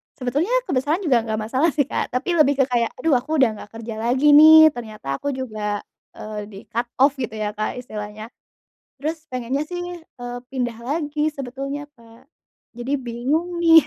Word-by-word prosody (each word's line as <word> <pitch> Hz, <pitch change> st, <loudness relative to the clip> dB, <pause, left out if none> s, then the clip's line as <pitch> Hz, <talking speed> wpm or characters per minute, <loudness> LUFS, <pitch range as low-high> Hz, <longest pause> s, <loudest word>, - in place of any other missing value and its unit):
sebetulnya 290 Hz, -, -1 dB
kebesaran 305 Hz, -, 0 dB
juga 260 Hz, -7 st, +4 dB
gak 220 Hz, -1 st, -2 dB
masalah 260 Hz, +9 st, +1 dB
sih, 285 Hz, -, +3 dB
Kak, -, -, -3 dB
tapi 335 Hz, +7 st, 0 dB
lebih 285 Hz, -2 st, +5 dB
ke -, -, 0 dB
kayak 235 Hz, -2 st, +1 dB
aduh 270 Hz, 0 st, +2 dB
aku 305 Hz, +6 st, -3 dB
udah 255 Hz, -, +6 dB, 0.2 s
gak -, -, -25 dB
kerja 225 Hz, -1 st, -6 dB
lagi 260 Hz, +6 st, +3 dB
nih, 315 Hz, +1 st, +10 dB
ternyata 215 Hz, -, -5 dB
aku 285 Hz, -1 st, -2 dB
juga, 215 Hz, -5 st, -3 dB, 0.3 s
eee, 210 Hz, -1 st, -6 dB
di 200 Hz, -2 st, -10 dB
cut 240 Hz, +1 st, -1 dB
off 280 Hz, +1 st, +5 dB
gitu 230 Hz, -4 st, -3 dB
ya, 210 Hz, -1 st, -2 dB
Kak, 215 Hz, 0 st, -3 dB
istilahnya. 215 Hz, -1 st, -7 dB, 0.7 s
Terus 310 Hz, +2 st, -3 dB
pengennya 255 Hz, +3 st, -2 dB
sih, 355 Hz, +2 st, -5 dB, 0.4 s
eee, 245 Hz, 0 st, -5 dB
pindah 245 Hz, -3 st, -2 dB
lagi 300 Hz, +2 st, -1 dB
sebetulnya, 275 Hz, +2 st, -5 dB
Kak, 230 Hz, +2 st, -19 dB, 0.5 s
jadi 245 Hz, +4 st, -3 dB
bingung 275 Hz, +9 st, -2 dB
nih. 325 Hz, -1 st, +8 dB
255 Hz, 175 wpm, -22 LUFS, 230-295 Hz, 0.7 s, nih